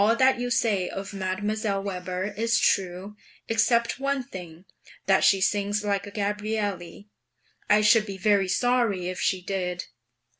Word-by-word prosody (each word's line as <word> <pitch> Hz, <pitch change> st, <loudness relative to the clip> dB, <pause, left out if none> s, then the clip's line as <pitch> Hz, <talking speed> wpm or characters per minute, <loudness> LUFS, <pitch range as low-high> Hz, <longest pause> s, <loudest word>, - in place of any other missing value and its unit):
All 225 Hz, +3 st, +4 dB
that 260 Hz, 0 st, +3 dB
you 245 Hz, 0 st, -2 dB
say 215 Hz, -6 st, +1 dB
of 195 Hz, +1 st, -6 dB
Mdlle. 200 Hz, +1 st, -2 dB
Weber 185 Hz, +1 st, -4 dB
is 230 Hz, +2 st, +1 dB
true, 190 Hz, +2 st, 0 dB, 0.3 s
except 235 Hz, +2 st, +1 dB
one 275 Hz, -1 st, -1 dB
thing: 180 Hz, -5 st, -10 dB, 0.4 s
that 195 Hz, 0 st, +3 dB
she 195 Hz, -, +5 dB
sings 205 Hz, +2 st, 0 dB
like 200 Hz, -1 st, -1 dB
a -, -, -9 dB
Gabrielli; 205 Hz, -2 st, -3 dB, 0.6 s
I 210 Hz, +1 st, +5 dB
should 215 Hz, +1 st, +4 dB
be 195 Hz, -1 st, -6 dB
very 200 Hz, 0 st, +2 dB
sorry 215 Hz, -3 st, +1 dB
if 185 Hz, -, -5 dB
she 185 Hz, -2 st, 0 dB
did. 180 Hz, -2 st, -3 dB
205 Hz, 150 wpm, -26 LUFS, 190-220 Hz, 0.6 s, she